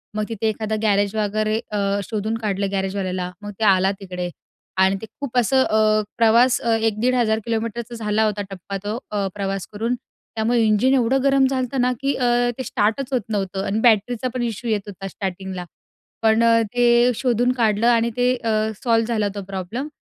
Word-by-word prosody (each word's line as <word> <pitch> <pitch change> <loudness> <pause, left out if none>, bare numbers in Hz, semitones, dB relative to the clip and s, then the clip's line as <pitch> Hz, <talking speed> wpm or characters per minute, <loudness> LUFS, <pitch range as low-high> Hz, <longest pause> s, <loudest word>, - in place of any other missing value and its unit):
मग 215 - 0
तिथे 225 0 -2
एखादा 220 0 -2
गॅरेज 205 0 +2
वगैरे 215 +1 0
अ, 200 -1 0
शोधून 220 +2 -2
काढलं 200 -3 -2
गॅरेजवाल्याला, 190 -2 -2
मग 205 0 -6
ते - - -1
आला 190 +1 +2
तिकडे. 180 -2 -5 0.5
आणि 190 +1 +4
ते - - -6
खूप 255 -3 -4
असं 260 +2 +4
अ, 215 0 +3 0.2
प्रवास 235 +3 +4 0.2
1,000-1,500 225 0 +1
किलोमीटरचा 230 +1 -3
झाला 215 -1 0
होता 210 -1 -1
टप्पा 195 +1 -6
तो, 210 +3 -3
अ, 200 -2 -1
प्रवास 195 -1 -3
करून. 230 +4 -1 0.4
त्यामुळे 230 +2 +1
इंजिन 215 +5 +3
एवढं 260 +1 +2
गरम 275 -1 +4
झालं 260 -1 -1
ना, 250 +1 +2
की 275 0 +1
अ, 250 - -1 0.3
ते 260 - -3
स्टार्टच 235 +5 -1
होत 250 - +2
नव्हतं 195 -2 -2
आणि 210 +3 -1
बॅटरीचा 235 +2 +2
पण 250 - -2
इशू 235 0 -4
येत 215 -2 +1
होता 195 -1 -7
स्टार्टिंगला. 190 -1 -5 0.6
पण 220 +1 +3
अ, 230 0 +5
ते 240 0 +4
शोधून 245 0 +1
काढलं 220 0 +2
आणि 235 -1 +3
ते 250 +1 +3
अ, 225 - 0 0.3
सॉल्व 230 -2 +3
झाला 220 -3 0
तो 200 - -4
प्रॉब्लम. 195 +9 -4
220 Hz, 175 wpm, -22 LUFS, 200-240 Hz, 0.6 s, अ